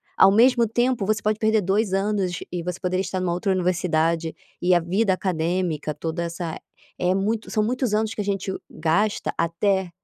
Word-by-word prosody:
ao 195 - +7
mesmo 235 +1 +5
tempo 240 -1 +1
você 215 -1 +1
pode 215 0 0
perder 220 -1 +3
2 195 +2 +1
anos 195 -3 0
e 175 -1 -3
você 180 0 -4
poderia 185 0 0
estar 190 0 -3
numa 180 -2 0
outra 180 +3 -1
universidade, 170 -3 0 0.3
e 180 +1 +3
a 175 - +5
vida 190 +5 +1
acadêmica 175 -3 -1
toda 160 +3 -3
essa 170 -1 -4 0.4
é 180 +1 +2
muito 215 +3 -1
são 215 - +1
muitos 245 0 -1
anos 220 0 0
que 215 - -3
a - - -2
gente 195 -1 -2 0.2
gasta 170 +7 0
até 185 +3 0
190 Hz, 185 wpm, -23 LUFS, 175-215 Hz, 0.4 s, ao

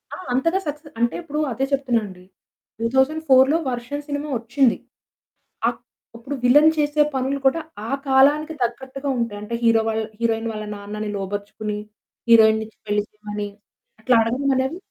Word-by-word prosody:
ఆ! - - -9 0.2
అంతగా 330 +9 +2
సక్సె 295 +1 -5
అంటే 235 0 +1
ఇప్పుడు 300 -2 -4
అదే 265 +4 -1
చెప్తున్నానండి. 230 -9 -1 0.6
2004 265 +3 +3
వర్షం 245 +4 -4
సినిమా 290 +1 -3
వచ్చింది. 245 +2 +2 0.9
ఆప్ - - -2 0.4
ఇప్పుడు 270 +5 -5
విల్లెన్ 295 +6 +7
చేసే 295 0 +2
పనులు 265 +2 -1
కూడా 325 +5 +3 0.3
ఆ - - -5 0.2
కాలానికి 290 +4 +4
తగ్గట్టుగా 265 +4 -4
ఉంటాయి. 215 -3 -2
అంటే 230 +3 -4
హీరో 230 -1 +5
వల్ 220 0 -1 0.2
హీరోయిన్ 230 0 0
వాళ్ళ 215 0 -5
నాన్నని 210 +1 -5
లోబరుచుకొని, 205 +2 -4 0.5
హీరోయిన్‌ని 220 -1 +6
ఇచ్చి 220 - -22
పెళ్లి 205 0 +1
చేయమని 210 -1 -6 0.5
అట్లా 245 +2 +3
అడగడమనేది 265 +5 0
245 Hz, 135 wpm, -22 LUFS, 220-280 Hz, 0.9 s, విల్లెన్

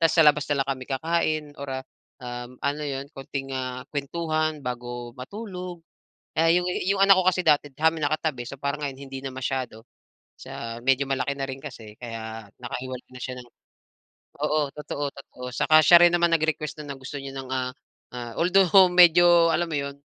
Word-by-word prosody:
tapos 165 -1 +4
sa 165 - +7
labas 150 0 +5
na 140 -1 +2
lang 140 - -14
kami 130 - -9
kakain, 155 +2 0 0.2
or 140 - -6
ah - - -15 0.4
um 120 0 -7
ano 145 +2 -1
'yon, 140 -1 -4
konting 135 0 -5
ah 130 -1 -4
kuwentuhan 155 +1 -1
bago 120 -1 -5
matulog. 180 - -7 0.5
Ah, 165 +1 +4
'yong 180 +1 +3 0.2
'yong 195 0 +1
anak 195 -1 +7
ko - - -2
kasi 185 0 +2
dati 145 -1 +4
sa'min 160 +3 +1
nakatabi, 145 -4 -1
so 140 - -7
parang 140 +1 -2
ngayon 135 -2 -4
hindi 135 0 -6
na - - -2
masyado, 130 -3 -4 0.5
sa 115 0 -7
medyo 135 +1 +3
malaki 135 +1 0
na 135 - -2
rin 130 - -4
kasi 115 -7 -9
kaya 115 -2 -7
nakahiwalay 125 +1 -6
na 125 - -10
siya 130 - -4
ng 120 - -14 1.0
oo, 150 -1 +1
totoo-totoo. 140 -3 -6
'Tsaka 155 +3 +5
siya 175 0 +8
rin 170 - +3
naman 170 0 +4
nag-request 155 -1 -1
nun 145 -1 -6
na 135 - -13
gusto 130 +2 -7
niyo 135 0 -7
ng 130 - -10
ah 130 -1 -1 0.5
ah. 120 -1 -6
Although 185 +1 +5
medyo, 175 -1 +7
alam 175 +2 +1
mo 150 - -1
yun, 140 0 -4
140 Hz, 185 wpm, -25 LUFS, 130-165 Hz, 1.0 s, siya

